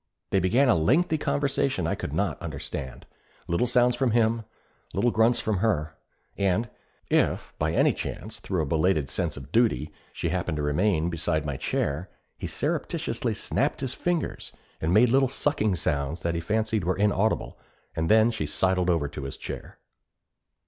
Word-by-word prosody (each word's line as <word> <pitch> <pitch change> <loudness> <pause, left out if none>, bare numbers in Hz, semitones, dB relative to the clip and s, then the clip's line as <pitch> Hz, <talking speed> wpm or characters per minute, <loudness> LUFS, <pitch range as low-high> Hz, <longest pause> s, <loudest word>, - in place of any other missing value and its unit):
They 95 - +4
began 115 +10 +3
a 125 - +6
lengthy 150 - +2
conversation 135 - 0
I 85 - 0
could - - -4
not - - -1
understand 65 -3 -6 0.4
little 85 +9 +1
sounds 125 0 +3
from 130 0 +1
him, 115 0 +2 0.5
little 120 - +2
grunts 115 +2 +3
from 110 -2 0
her. 80 -7 0 0.4
If, 100 +4 -1
by - - 0
any - - +4
chance, - - -6
through 90 -5 -1
a - - -2
belated 80 -1 +1
sense 85 -5 -2
of 65 - -10
duty, 115 -9 +2 0.2
she - - -2
happened - - -1
to 75 - -2
remain 85 +3 +1
beside 80 -1 -1
my 70 -2 -2
chair, 75 +6 -2 0.3
he - - -5
surreptitiously - - -2
snapped - - -1
his 130 -2 -2
fingers 175 0 -2 0.3
and 80 - 0
made 115 +6 +6
little 135 0 +4
sucking 120 -7 0
sounds 75 -2 -2
that 85 - 0
he 85 - -2
fancied 110 +2 0
were 90 +2 0
inaudible, 105 +1 +1 0.4
and 80 0 -1
then 110 +1 +5
she 80 -10 -3
sidled 90 +2 +1
over 80 -5 +2
to 70 0 -7
his 70 - -5
chair. - - -7
95 Hz, 165 wpm, -26 LUFS, 80-115 Hz, 0.5 s, a